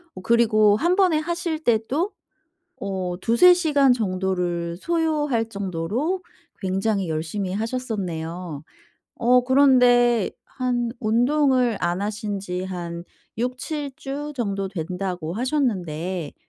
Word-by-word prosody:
어 185 - -8
그리고 215 -2 +4
1 345 +8 +2
번에 365 -6 +3
하실 335 -1 -3
때도 250 - +1 0.7
어 185 -2 -3
2-3 295 +11 +6
시간 290 -7 +3
정도를 185 -5 -2
소요할 295 - 0
정도로 200 - -2 0.4
굉장히 195 -1 0
열심히 175 +5 -3
하셨었네요. 180 - -4 0.5
어 250 +1 +4
그런데 245 -4 +4 0.2
한 245 -3 -1
운동을 250 +1 +2
안 175 +3 0
하신 205 -1 -3
지 180 -1 -4
한 170 -2 -5 0.3
6-7 270 +4 -3
주 290 +2 -5
정도 200 -5 -2
된다고 180 -2 -4
하셨는데 185 - -2
220 Hz, 205 characters per minute, -23 LUFS, 185-265 Hz, 0.7 s, 2-3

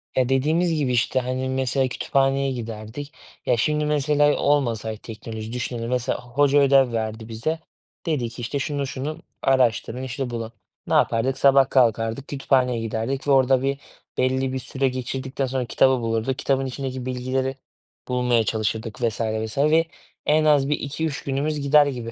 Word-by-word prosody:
Ya, 130 -1 +2
dediğimiz 160 +6 +2
gibi, 145 -5 0
işte, 125 +1 +2
hani, 130 +1 -2
mesela 130 0 +1
kütüphaneye 135 +1 +1
giderdik. 115 +4 -6 0.3
Ya, 125 - +2
şimdi, 150 +4 +1
mesela 150 0 +3
olmasaydı 115 -6 0
teknoloji, 110 0 -7
düşünelim. 120 -1 -3
Mesela, 125 0 0
h - - -11
hoca 145 +2 +3
ödev 135 -3 +4
verdi 110 0 -3
bize. 135 +9 -2 0.5
Dedi 135 -8 -1
ki, 120 +1 -9
işte, 120 +4 -2
"Şunu 140 -1 -2
şunu 140 +4 -4 0.2
araştırın, 130 -1 +1
işte, 130 0 -4
bulun." 115 -1 -5 0.4
Ne - - -1
yapardık? 125 +4 +2
Sabah 135 -1 +5
kalkardık, 115 +1 +2
kütüphaneye 130 -3 +1
giderdik 115 +5 -3
ve - - +3
orada 130 -1 +4
bir 135 0 0 0.4
belli 130 +1 +1
bir 130 - -2
süre 135 +1 -1
geçirdikten 130 +1 -3
sonra 130 -1 -2
kitabı 130 +1 +3
bulurduk, 115 +3 -1
kitabın 135 -1 +1
içindeki 130 -1 -5
bilgileri 130 +1 -2 0.5
bulmaya 125 -2 +2
çalışırdık 110 +1 -2
vs. 115 -1 0
vs. 110 0 -2 0.9
Az, 145 -2 +4
bir 150 - +1
2-3 145 +1 -3
günümüz 145 +2 -1
gider 145 +1 +5
gibi. 120 -5 -4
130 Hz, 155 wpm, -23 LUFS, 115-140 Hz, 0.9 s, Sabah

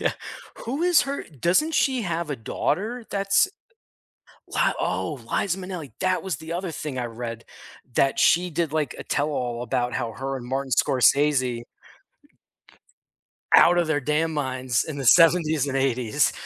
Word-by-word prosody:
Yeah, - - +1 0.5
who 270 +8 -3
is 355 -3 +5
her 280 +1 -4
doesn't 175 - 0
she 265 -6 +2
have 170 -4 -3
a 145 - -2
daughter 220 - -2
that's 200 - +2 1.0
wha - - +1
oh, - - -2
Liza 190 -2 0
Minnelli, 180 -6 -7
that 185 0 0
was 185 -7 -3
the 160 +1 -7
other 180 -1 -3
thing 145 -3 -5
I 120 - -2
read, 115 0 -6 0.5
that 135 -1 +2
she 180 +1 +4
did, 160 -1 -1
like, 150 -5 -1
a - - -7
tell-all 125 -5 -2
about 125 -1 -1
how 120 -2 -2
her 135 +2 -4
and 120 - -9
Martin 135 +1 -3
Scorsese 130 -1 +2 1.9
out 175 +1 +7
of 175 - +2
their 155 -2 0
damn 150 +3 0
minds 130 -3 -1
in 150 -3 -6
the 135 - -4
‘70s 160 0 +5
and 135 - -2
‘80s 125 -4 +1
150 Hz, 155 wpm, -24 LUFS, 130-180 Hz, 1.9 s, out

